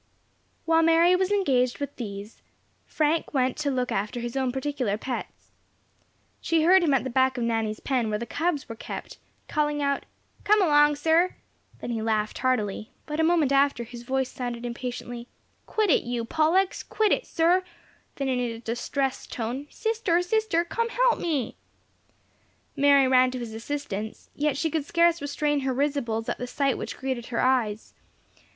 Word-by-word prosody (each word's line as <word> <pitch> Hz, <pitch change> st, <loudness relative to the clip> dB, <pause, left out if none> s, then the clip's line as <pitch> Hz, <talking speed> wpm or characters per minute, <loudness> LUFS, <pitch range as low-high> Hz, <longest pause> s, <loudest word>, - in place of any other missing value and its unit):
While 325 Hz, 0 st, +4 dB
Mary 330 Hz, +2 st, +5 dB
was 375 Hz, +1 st, 0 dB
engaged 260 Hz, -11 st, +2 dB
with 285 Hz, -1 st, -5 dB
these, 205 Hz, -2 st, -7 dB, 0.5 s
Frank 310 Hz, 0 st, 0 dB
went 255 Hz, -1 st, +2 dB
to 295 Hz, -2 st, -1 dB
look 255 Hz, -2 st, -1 dB
after 210 Hz, +5 st, -2 dB
his 240 Hz, +1 st, -5 dB
own 260 Hz, -2 st, 0 dB
particular 265 Hz, -5 st, -2 dB
pets. 250 Hz, +2 st, -6 dB, 0.9 s
She 330 Hz, -2 st, +2 dB
heard 370 Hz, +3 st, +6 dB
him 290 Hz, -5 st, +3 dB
at 250 Hz, -, +1 dB
the 260 Hz, -, -4 dB
back 260 Hz, +1 st, +2 dB
of 240 Hz, -, -1 dB
Nanny's 225 Hz, -2 st, -1 dB
pen, 250 Hz, -5 st, 0 dB
where 210 Hz, -, 0 dB
the 235 Hz, -, -5 dB
cubs 320 Hz, +3 st, -1 dB
were 230 Hz, -, -6 dB
kept, -, -, -8 dB, 0.3 s
calling 295 Hz, -1 st, 0 dB
out, 280 Hz, -1 st, -1 dB, 0.4 s
"Come 425 Hz, +1 st, +4 dB
along, 295 Hz, -5 st, +5 dB
sir!" 325 Hz, +4 st, +2 dB, 0.5 s
then -, -, -4 dB
he 225 Hz, -2 st, -2 dB
laughed 215 Hz, -1 st, -1 dB
heartily, 220 Hz, -4 st, -1 dB, 0.2 s
but 300 Hz, +1 st, -4 dB
a -, -, +3 dB
moment 320 Hz, -4 st, +3 dB
after 275 Hz, -3 st, +3 dB
his 235 Hz, +1 st, -10 dB
voice 260 Hz, +1 st, -1 dB
sounded 245 Hz, -1 st, -5 dB
impatiently, 240 Hz, 0 st, -5 dB, 0.4 s
"Quit 430 Hz, -5 st, +1 dB
it, -, -, +4 dB
you 240 Hz, -1 st, -3 dB
Pollux! 325 Hz, +8 st, +2 dB
quit 430 Hz, -2 st, 0 dB
it, -, -, +1 dB
sir!" 345 Hz, +3 st, +3 dB, 0.5 s
then 275 Hz, -, -2 dB
in 255 Hz, -1 st, 0 dB
a 235 Hz, -2 st, -2 dB
distressed 245 Hz, +4 st, -3 dB
tone, 245 Hz, +5 st, -4 dB
"Sister, 440 Hz, -7 st, 0 dB
sister, 385 Hz, -3 st, +1 dB
come 465 Hz, +6 st, -1 dB
help -, -, +2 dB
me!" 290 Hz, -9 st, -1 dB, 1.2 s
Mary 280 Hz, -2 st, +5 dB
ran 255 Hz, 0 st, +5 dB
to 255 Hz, -, -5 dB
his 235 Hz, -3 st, -6 dB
assistance, 220 Hz, -3 st, -5 dB
yet 290 Hz, -2 st, 0 dB
she 315 Hz, +2 st, -1 dB
could 315 Hz, -1 st, 0 dB
scarce 340 Hz, +1 st, +3 dB
restrain 290 Hz, +1 st, 0 dB
her 265 Hz, -2 st, -1 dB
risibles 255 Hz, -5 st, -1 dB
at -, -, -3 dB
the 250 Hz, -, -4 dB
sight 275 Hz, +1 st, 0 dB
which -, -, -6 dB
greeted 260 Hz, -3 st, -3 dB
her 235 Hz, -, -3 dB
eyes. 235 Hz, -5 st, +1 dB
270 Hz, 170 wpm, -26 LUFS, 240-320 Hz, 1.2 s, heard